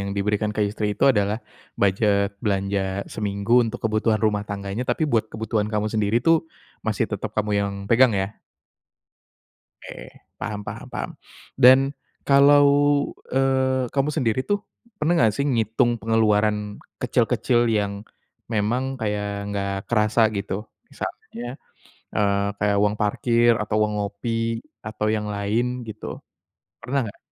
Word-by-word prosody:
yang 100 - -3
diberikan 105 +1 0
ke 105 - -3
istri 105 0 -2
itu - - 0
adalah 105 -4 +2 0.4
budget 100 0 +2
belanja 100 -1 -1
seminggu 105 +3 +1
untuk 115 +1 -5
kebutuhan 110 0 +1
rumah 105 -2 +1
tangganya, 100 +3 -4
tapi 155 - 0
buat 110 -4 0
kebutuhan 110 -1 -1
kamu 105 0 0
sendiri 110 0 0
itu 165 +5 +3 0.4
masih 110 0 0
tetep 105 +1 -4
kamu 105 -1 -1
yang 100 0 -1 0.2
pegang 120 +1 +5
ya? 95 +1 -2 1.5
Oke, - - -9 0.3
paham 105 -1 -4
paham - - -7
paham. - - -4 0.5
Dan, 135 +2 +7 0.3
kalau, 145 +1 +6 0.6
eee, 130 -1 +1
kamu 140 +1 +1
sendiri 125 -3 +1
tuh, 205 0 +2 0.4
pernah 155 +1 +1
enggak 115 -10 +3
sih 140 - 0
ngitung 120 -2 +1
pengeluaran 105 -2 +1 0.2
kecil-kecil 120 -1 +2
yang 100 -2 -1 0.5
memang 120 +5 -1
kayak 105 -1 -2 0.2
enggak 100 -1 -2 0.2
kerasa, 110 0 +2
gitu? 100 +1 -4 0.2
Misalnya, 120 +1 -7 0.7
eee, 100 -1 +2
kayak 105 -1 +2
uang 105 0 +2
parkir 115 +3 +3
atau 105 -1 -2
uang 105 - -4
ngopi, 115 +3 -2 0.2
atau 105 0 -3
yang 105 0 -3
lain 115 +5 -1
gitu? 110 0 -7 0.6
Pernah 135 +4 0
enggak? 100 - -10
110 Hz, 135 wpm, -23 LUFS, 105-120 Hz, 1.5 s, Dan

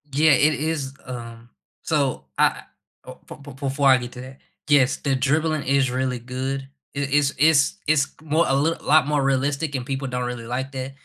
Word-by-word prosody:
Yeah, 150 +3 +3
it 150 +4 +4
is, 150 -3 -3
um 115 -2 -9 0.3
So 140 - -1
I - - +2 0.4
uh, - - -10
be - - -9
be 145 -1 -12
before 140 +1 -1
I 130 - +7
get 125 0 -6
to 125 - -9
that, 130 +1 -11 0.3
yes, 140 -3 +3
the 140 -2 -1
dribbling 155 +3 0
is 135 -1 +1
really 130 -1 -1
good. 130 +2 -4 0.3
I - - -3
is 140 0 +1
is 155 0 +4
is 145 -2 +3
more 160 +2 +1
a 135 - +2
little 155 +4 0
lot 150 -1 +4
more 150 -2 +1
realistic 140 +2 0
and 125 -2 -3
people 135 +1 -3
don't 125 0 -2
really 120 -1 -5
like 130 +3 -4
that 130 0 -5
135 Hz, 195 wpm, -23 LUFS, 130-145 Hz, 0.4 s, I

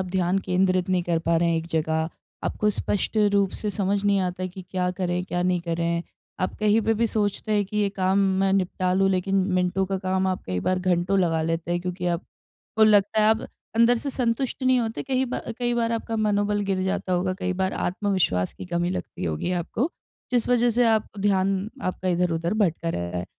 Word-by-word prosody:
आप 190 - -2
ध्यान 185 +1 +2
केंद्रित 185 -1 +1
नहीं 185 -1 +2
कर 170 -1 0
पा 165 0 +1
रहे 170 +1 +2
हैं 165 - +2
एक 160 - -3
जगह, 160 -1 0 0.4
आपको 210 0 +1
स्पष्ट 205 +2 -2 0.2
रूप 200 -2 +3
से 210 - -1
समझ 200 0 0
नहीं 200 -1 +3
आता 185 0 -2
कि 185 +1 -9
क्या 180 -1 0
करें, 180 -1 -2
क्या 175 -1 -2
नहीं 180 -1 +1
करें? 170 0 -1 0.4
आप 185 - -1
कहीं 215 +1 +3
पे 225 +1 +1
भी 230 - +3
सोचते 210 0 -1
हैं 205 -1 +2
कि 205 +2 -7
ये 205 -1 +2
काम 190 0 +2 0.2
मैं 195 0 +2
निपटा 185 -1 0
लूँ, 195 +1 +3
लेकिन 190 +1 0 0.2
मिनटों 185 +1 +1
का 195 0 -2
काम 190 0 0
आप 185 -1 -1
कई 90 -1 -2
बार 185 0 +2
घंटों 180 +1 +1
लगा 165 -3 +2
लेते 165 +1 -2
हैं 175 - 0
क्योंकि 180 0 -4
आपको 215 +4 -3
लगता 210 0 +4
है 215 - +4
आप 220 0 +1 0.3
अंदर 235 +1 +5
से 280 - -4
संतुष्ट 250 +1 -1
नहीं 255 0 +4
होते, 225 -1 -3
कही 260 -1 0
बार 245 -2 -4
कई 240 -1 0
बार 235 -1 0
आपका 225 0 -2
मनोबल 205 -1 +1
गिर 185 -1 0
जाता 190 0 -1
होगा, 180 +1 +1
कई 185 -1 -2
बार 190 +1 -1
आत्मविश्वास 185 - 0
की - - -8
कमी 175 0 -1
लगती 185 - -5
होगी 85 - -2
आपको, 180 - -1 0.4
जिस 245 -2 +1
वज़ह 240 -1 +3
से 240 +2 +3
आप 220 -1 +3
ध्यान 195 -1 +2 0.3
आपका 185 0 -2
इधर-उधर 175 0 0
भटक 180 -6 0
रहा 85 - -2
है। 90 - -3
185 Hz, 215 wpm, -25 LUFS, 175-210 Hz, 0.4 s, अंदर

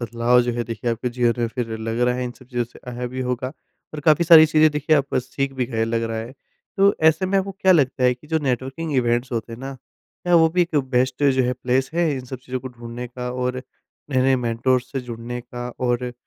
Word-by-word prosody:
बदलाव 120 +1 +2
जो 120 0 -1
है 120 0 -2
देखिए 115 +1 -3
आपके 115 +2 -2
जीवन 120 0 0
में 120 - +2
फिर 120 0 -4
लग 115 +1 -3
रहा 125 0 +2
है 125 0 -2
इन 120 - -4
सब 130 - -17
चीज़ों 120 -2 -2
से 120 - -17
आया 125 0 -4
भी 130 +1 -5
होगा, 125 0 -2 0.5
और 150 - -5
काफ़ी 155 +3 +4
सारी 160 -1 +9
चीज़ें 155 0 +4
देखिए 150 +1 +2
आप 140 -1 -1
सीख 135 +2 -2
भी 130 -2 -2
गए 115 -3 -1
लग 115 0 -1
रहा 115 -1 -2
है। 115 +3 -6 0.4
तो 200 0 +4
ऐसे 160 +4 +1
में 195 +1 +2
आपको 195 +1 -2
क्या 190 -1 +3
लगता 140 -6 +2
है 125 - +5
कि 125 +5 -19
जो 160 +1 +1
नेटवर्किंग 135 +3 -2
इवेंट्स 120 +1 +1
होते 115 0 -3
हैं 115 - -8
ना, 135 +1 -5
क्या 175 +6 -5
वो 165 -1 +6
भी 180 +2 +2
एक 165 -3 -2
बेस्ट 130 +2 +1
जो 130 -1 +3
है 125 - +1
प्लेस 130 +1 -1
है 170 -1 +2
इन 130 - -6
सब 130 0 -7
चीज़ों 130 -1 -4
को 130 - -6
ढूँढ़ने 120 0 -8
का 125 0 -5
और 125 0 -2 0.5
नए-नए 130 0 +3
मेंटर 120 +1 +1
से 130 +2 -6
जुड़ने 120 0 -6
का 120 0 -7 0.2
और 120 0 -1
125 Hz, 245 wpm, -22 LUFS, 120-140 Hz, 0.5 s, सारी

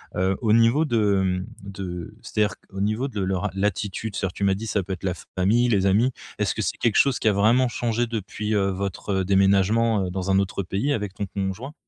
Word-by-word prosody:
Heu, 95 +1 +1
au 110 -3 +3
niveau 115 +7 +4
de, 105 -7 +2
mmh 90 0 -1 0.2
de 90 -4 -6
c'est-à-dire 105 -1 0
qu'au 95 -1 -8
niveau 110 +7 0
de 105 - -5
leur 95 +2 -1
l'attitude, 100 +1 -2
c'est-à-dire, 95 -3 -1
tu 100 - -2
m'as 95 - +3
dit, 110 +4 -5
ça 100 -2 0
peut 95 +2 -4
être 95 - -8
la 95 - 0 0.2
famille, 110 +7 +3
les 100 -5 +2
amis. 105 +7 +3 0.3
Est-ce - - 0
que - - -2
c'est - - -2
quelque 115 -3 +1
chose 135 -3 +4
qui - - 0
a 105 - +5
vraiment 115 +6 +4
changé 120 0 -1
depuis, 110 -1 -3
heu, 100 -1 +2
votre 95 0 -2
déménagement, 100 +3 +3
heu, 90 - -4
dans 95 +1 -2
un 95 - +4
autre 100 0 -1
pays 100 +11 -1
avec 105 -7 -3
ton 100 - -3
conjoint? 100 - -4
100 Hz, 220 wpm, -24 LUFS, 95-115 Hz, 0.3 s, a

